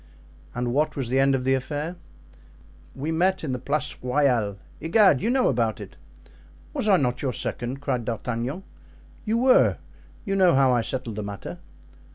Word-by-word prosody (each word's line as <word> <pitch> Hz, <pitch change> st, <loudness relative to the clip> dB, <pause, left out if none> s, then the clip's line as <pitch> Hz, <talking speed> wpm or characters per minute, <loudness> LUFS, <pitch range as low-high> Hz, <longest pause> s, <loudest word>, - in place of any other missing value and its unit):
"And 120 Hz, 0 st, -1 dB
what 150 Hz, +3 st, +1 dB
was 135 Hz, -5 st, -3 dB
the 130 Hz, +2 st, +2 dB
end 135 Hz, 0 st, +4 dB
of 130 Hz, -, -2 dB
the 130 Hz, +1 st, +2 dB
affair?" 145 Hz, +6 st, -3 dB, 1.0 s
"We 145 Hz, +5 st, -3 dB
met 180 Hz, +3 st, +1 dB
in 145 Hz, -, -2 dB
the 125 Hz, -, -2 dB
Place 145 Hz, +4 st, -1 dB
Royale—Egad! 135 Hz, -, +2 dB
you -, -, 0 dB
know 255 Hz, 0 st, +3 dB
about 115 Hz, -4 st, 0 dB
it." -, -, -10 dB, 0.8 s
"Was 215 Hz, -, -1 dB
I 195 Hz, -, +6 dB
not 125 Hz, -4 st, -1 dB
your 130 Hz, -3 st, -1 dB
second?" 130 Hz, +4 st, -4 dB
cried 125 Hz, -4 st, -1 dB
D'Artagnan. 120 Hz, -, -3 dB, 0.6 s
"You 220 Hz, +1 st, +1 dB
were; 255 Hz, +2 st, +4 dB, 0.5 s
you 195 Hz, -2 st, -1 dB
know 185 Hz, -5 st, +5 dB
how 135 Hz, -1 st, +4 dB
I 120 Hz, -, +2 dB
settled 115 Hz, -2 st, -4 dB
the -, -, -2 dB
matter." 100 Hz, -1 st, -7 dB
135 Hz, 170 wpm, -25 LUFS, 125-160 Hz, 1.0 s, I